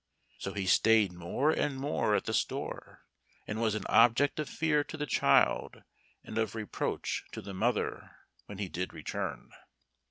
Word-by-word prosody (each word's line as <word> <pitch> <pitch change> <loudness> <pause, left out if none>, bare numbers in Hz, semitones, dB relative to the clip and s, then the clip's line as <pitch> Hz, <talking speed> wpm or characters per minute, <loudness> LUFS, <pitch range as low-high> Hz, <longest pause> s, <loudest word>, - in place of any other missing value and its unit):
So 95 - -4
he 100 -1 -2
stayed 105 0 +4
more 90 - 0
and 145 -3 -1
more 140 +3 +1
at - - 0
the - - -2
store, - - -3 0.4
and 110 +2 -4
was 110 -2 +1
an 110 - -4
object 120 +6 +4
of 150 - -2
fear 150 -2 +1
to 155 - -8
the 150 - -2
child 135 - +2 0.4
and 110 - -4
of 110 -1 -1
reproach 110 -2 -3
to - - -5
the 100 0 -8
mother 115 +6 -1 0.4
when 100 - -8
he 100 -1 -3
did 90 +1 -4
return. - - -5
110 Hz, 165 wpm, -31 LUFS, 100-140 Hz, 0.4 s, stayed